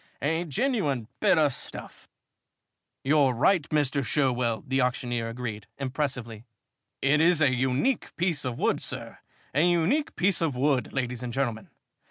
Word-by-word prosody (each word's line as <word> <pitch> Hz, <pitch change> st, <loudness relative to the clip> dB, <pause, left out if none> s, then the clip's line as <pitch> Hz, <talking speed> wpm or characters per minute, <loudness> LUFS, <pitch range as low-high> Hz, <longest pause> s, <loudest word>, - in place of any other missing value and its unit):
"A 160 Hz, +4 st, 0 dB
genuine 150 Hz, -, 0 dB
bit 200 Hz, -3 st, +4 dB
o' 150 Hz, -2 st, +4 dB
stuff." 135 Hz, -, -9 dB, 0.9 s
"You're 140 Hz, -2 st, +3 dB
right, 155 Hz, +6 st, +2 dB
Mr. 145 Hz, -2 st, +1 dB
Sherwell," 125 Hz, -5 st, 0 dB
the 135 Hz, +1 st, +1 dB
auctioneer 120 Hz, -2 st, -1 dB
agreed, 115 Hz, -3 st, -6 dB
impressively. 130 Hz, -5 st, -3 dB, 0.6 s
"It 145 Hz, +3 st, +4 dB
is 170 Hz, 0 st, +4 dB
a 140 Hz, -4 st, +4 dB
unique 130 Hz, -, 0 dB
piece 170 Hz, -4 st, 0 dB
of 125 Hz, -3 st, -3 dB
wood, -, -, +1 dB
sir -, -, -7 dB, 0.3 s
a 140 Hz, -, +3 dB
unique 175 Hz, -, +2 dB
piece 185 Hz, 0 st, +2 dB
of 155 Hz, -5 st, 0 dB
wood, 130 Hz, -2 st, +1 dB
ladies 125 Hz, -2 st, -2 dB
and 125 Hz, -1 st, -4 dB
gentlemen. 120 Hz, -4 st, -2 dB
135 Hz, 145 wpm, -27 LUFS, 125-160 Hz, 0.9 s, bit